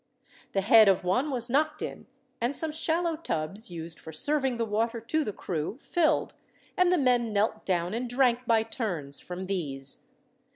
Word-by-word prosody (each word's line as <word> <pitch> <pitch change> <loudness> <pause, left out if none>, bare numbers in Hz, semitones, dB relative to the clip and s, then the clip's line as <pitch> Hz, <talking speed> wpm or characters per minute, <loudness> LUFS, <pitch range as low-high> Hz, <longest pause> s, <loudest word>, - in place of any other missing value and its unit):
The 195 - +1
head 220 +1 +7
of 190 - +2
one 220 +12 +1
was 245 -4 0
knocked 305 +4 +1
in, - - -7 0.3
and 245 +4 +1
some 320 -1 0
shallow 325 +2 0
tubs, 195 - -3
used 165 -1 -3
for 160 - -10
serving 265 - +2
the 230 - 0
water 225 +2 -1
to 310 +8 -1
the 210 - -3
crew, 175 +2 -4
filled, 335 +1 +1 0.4
and 365 -1 +3
the 360 - +4
men 245 -5 +2
knelt 210 +1 0
down 175 0 0
and 240 +2 -3
drank 245 -1 +2
by 225 -1 +4
turns 180 - -4
from 180 +1 -7
these. 140 -8 -3
230 Hz, 175 wpm, -28 LUFS, 185-270 Hz, 0.4 s, head